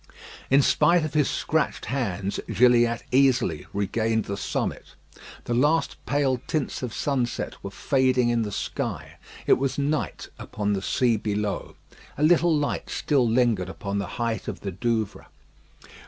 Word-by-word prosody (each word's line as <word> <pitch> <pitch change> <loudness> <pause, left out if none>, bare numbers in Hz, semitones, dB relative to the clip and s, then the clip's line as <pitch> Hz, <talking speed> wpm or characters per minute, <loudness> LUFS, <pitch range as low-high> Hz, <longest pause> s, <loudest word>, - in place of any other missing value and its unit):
In 135 +1 +5
spite 170 +3 +3
of 155 - -5
his 150 -3 +2
scratched - - -1
hands, 100 -6 -2
Gilliatt 120 -1 +4
easily 130 -2 +2
regained 110 +3 0
the 100 - -3
summit. 100 - -4 0.5
The 120 - -2
last 150 +7 +2
pale 135 -4 +1
tints 155 -4 -2
of 125 -3 -4
sunset 130 -1 -2
were 100 - -4
fading 130 +2 +1
in 120 -1 +1
the 105 -2 -3
sky. - - -4 0.3
It - - +4
was 135 0 -1
night 145 +2 -2
upon 105 -1 -2
the 95 - -1
sea 120 +3 +1
below. 105 -1 -3 0.4
A 145 - -1
little 170 +1 +4
light 145 -1 -2
still 135 -6 +1
lingered 115 -6 +2
upon 100 +1 -4
the 100 - -3
height 115 -4 -2
of - - -5
the 100 - -4
Douvre. 110 +2 -2
120 Hz, 150 wpm, -25 LUFS, 105-135 Hz, 0.5 s, In